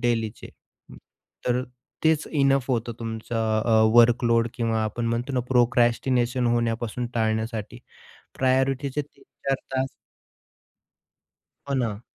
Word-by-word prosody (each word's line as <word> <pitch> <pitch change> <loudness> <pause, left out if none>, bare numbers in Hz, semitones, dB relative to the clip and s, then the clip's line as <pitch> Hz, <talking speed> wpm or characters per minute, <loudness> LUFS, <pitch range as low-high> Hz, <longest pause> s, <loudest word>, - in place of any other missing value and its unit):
डेलीचे 115 -2 -1 0.4
हं, - - -12 0.5
तर 125 +1 +1 0.4
तेच 160 -1 +3
इनअफ 135 -3 +2
होतं 120 -1 -1
तुमचं 110 -1 -2
अ, 110 -2 +4
वर्क 120 +1 +6
लोड 115 0 +3
किंवा 115 -2 0
आपण 115 +2 -3
म्हणतो 120 +4 -2
ना 130 - +1
प्रोक्रास्टिनेशन 125 0 +2
होण्यापासून 120 0 -1
टाळण्यासाठी 110 0 -2 0.6
प्रायोरिटीचे 135 +2 +1
3-4 140 -1 -5 0.2
तास 130 0 +1 1.8
हो 140 - 0
ना. 115 -4 -1
120 Hz, 110 wpm, -25 LUFS, 115-130 Hz, 1.8 s, वर्क